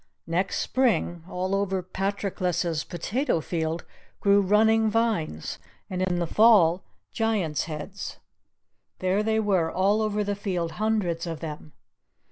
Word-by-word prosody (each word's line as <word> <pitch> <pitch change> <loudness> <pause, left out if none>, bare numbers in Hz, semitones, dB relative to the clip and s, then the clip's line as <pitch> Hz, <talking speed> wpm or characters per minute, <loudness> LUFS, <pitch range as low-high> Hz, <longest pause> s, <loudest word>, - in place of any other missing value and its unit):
Next 180 +4 -1
spring 220 -10 +1
all 185 +1 -2
over 195 -2 0
Patroclus's 185 -3 -1
potato 210 - -1
field 160 0 -3 0.3
grew 200 0 +4
running 220 +3 +4
vines, 215 - -1 0.3
and 185 0 -2
in 185 -1 0
the 175 - 0
fall 190 -3 +5 0.3
Giant's 205 - 0
heads. 165 +5 -6 0.8
There 185 +2 +1
they 220 +1 +1
were 190 -6 +1
all 200 +4 +2
over 210 -1 0
the 205 0 -1
field, 185 -5 -2
hundreds 195 -6 -1
of 165 -2 -4
them! 155 -1 -7
190 Hz, 125 wpm, -26 LUFS, 170-210 Hz, 0.8 s, fall